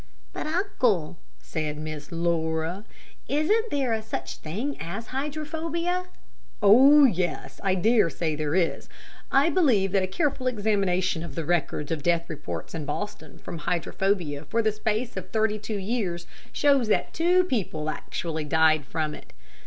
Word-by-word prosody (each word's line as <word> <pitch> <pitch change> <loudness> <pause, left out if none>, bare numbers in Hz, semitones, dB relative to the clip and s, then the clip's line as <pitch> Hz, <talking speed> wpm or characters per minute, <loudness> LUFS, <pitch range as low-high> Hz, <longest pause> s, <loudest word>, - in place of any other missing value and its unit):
"But, - - -4
uncle," 250 - 0 0.2
said 155 -2 -4
Miss 155 0 -6
Laura, 165 +2 -1 0.4
"isn't 420 +11 +2
there 250 - 0
such 220 - -5
a - - -15
thing 220 - -3
as 195 +8 -5
hydrophobia?" 320 +5 -2 0.5
"Oh, 265 +8 +8
yes; 180 -7 -1
I 190 -1 +2
dare 215 0 +4
say 160 -1 -2
there 150 +1 -1
is. 175 -3 0 0.4
I 280 +5 +4
believe 240 - +3
that 195 -1 +3
a 185 - 0
careful 270 - -1
examination 195 -6 +1
of 170 - -7
the 165 - -3
records 160 -3 -1
of 160 -2 -1
death 170 +1 +1
reported 90 - -6
in 155 -3 -4
Boston 160 0 -5
from 170 - -7
hydrophobia 170 -2 -1
for 230 +10 0
the 215 - +3
space 215 +3 -2
of - - -6
thirty 215 -1 +1
two 215 0 -4
years, 190 -4 -2 0.3
shows 275 -5 +3
that 215 - +1
two 360 +2 +4
people 195 - -2
actually 160 0 -3
died 155 -1 +3
from 155 0 -2
it. - - -12
195 Hz, 155 wpm, -26 LUFS, 160-255 Hz, 0.5 s, Oh